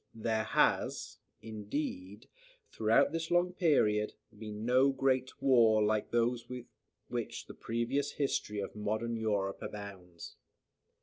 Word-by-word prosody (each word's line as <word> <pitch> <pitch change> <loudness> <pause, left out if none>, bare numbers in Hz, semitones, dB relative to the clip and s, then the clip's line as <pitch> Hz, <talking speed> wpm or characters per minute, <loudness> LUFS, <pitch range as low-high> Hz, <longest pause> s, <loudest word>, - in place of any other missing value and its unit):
There 110 -1 -1
has, - - +1 0.2
indeed, 105 -2 -5 0.4
throughout 110 +5 +3
this 165 0 -3
long 175 +1 +2
period, 105 - +2 0.2
been 105 0 -7
no 130 +3 +5
great 130 -1 0
war, 115 -5 +5
like 105 0 +1
those 120 0 0
with 125 -1 -6 0.4
which - - -4
the - - -10
previous 125 +5 -2
history 120 -7 -1
of 100 - -6
modern 110 +3 -2
Europe 105 -3 -1
abounds. 95 -4 -8
115 Hz, 120 wpm, -32 LUFS, 105-130 Hz, 0.4 s, no